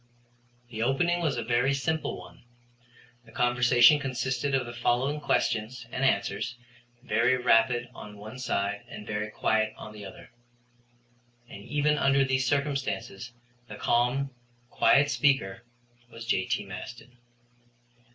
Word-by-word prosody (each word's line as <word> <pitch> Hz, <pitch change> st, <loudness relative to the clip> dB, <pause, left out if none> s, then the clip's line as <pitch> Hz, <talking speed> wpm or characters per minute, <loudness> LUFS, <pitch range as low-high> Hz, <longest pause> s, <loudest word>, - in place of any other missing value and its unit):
The 110 Hz, -1 st, -5 dB
opening 170 Hz, +8 st, +1 dB
was 150 Hz, -6 st, 0 dB
a 120 Hz, -, -2 dB
very 125 Hz, +4 st, +1 dB
simple 160 Hz, +3 st, -2 dB
one. -, -, -13 dB, 0.8 s
The 110 Hz, -, -18 dB
conversation 120 Hz, +3 st, +5 dB
consisted 135 Hz, 0 st, -1 dB
of 130 Hz, -2 st, 0 dB
the 120 Hz, -, -7 dB
following 125 Hz, +5 st, 0 dB
questions 115 Hz, -2 st, -1 dB
and -, -, -3 dB
answers, 120 Hz, -, 0 dB, 0.5 s
very 120 Hz, +1 st, +2 dB
rapid 120 Hz, 0 st, +3 dB
on 105 Hz, -3 st, -10 dB
one 110 Hz, +5 st, -9 dB
side 105 Hz, -4 st, -1 dB
and 105 Hz, -, -9 dB
very 105 Hz, 0 st, -3 dB
quiet 110 Hz, 0 st, 0 dB
on 105 Hz, -, -9 dB
the 105 Hz, -1 st, -10 dB
other. 95 Hz, -, -11 dB, 1.2 s
And 100 Hz, -, -10 dB
even 150 Hz, 0 st, +1 dB
under 135 Hz, 0 st, +3 dB
these 130 Hz, -1 st, 0 dB
circumstances 135 Hz, -6 st, -2 dB, 0.4 s
the -, -, -8 dB
calm, 125 Hz, +3 st, +1 dB, 0.4 s
quiet 145 Hz, +1 st, +4 dB
speaker 120 Hz, -7 st, +1 dB, 0.4 s
was 115 Hz, -1 st, -10 dB
J.T. 95 Hz, -2 st, 0 dB
Maston. 120 Hz, +6 st, -10 dB
120 Hz, 130 wpm, -28 LUFS, 110-135 Hz, 1.2 s, conversation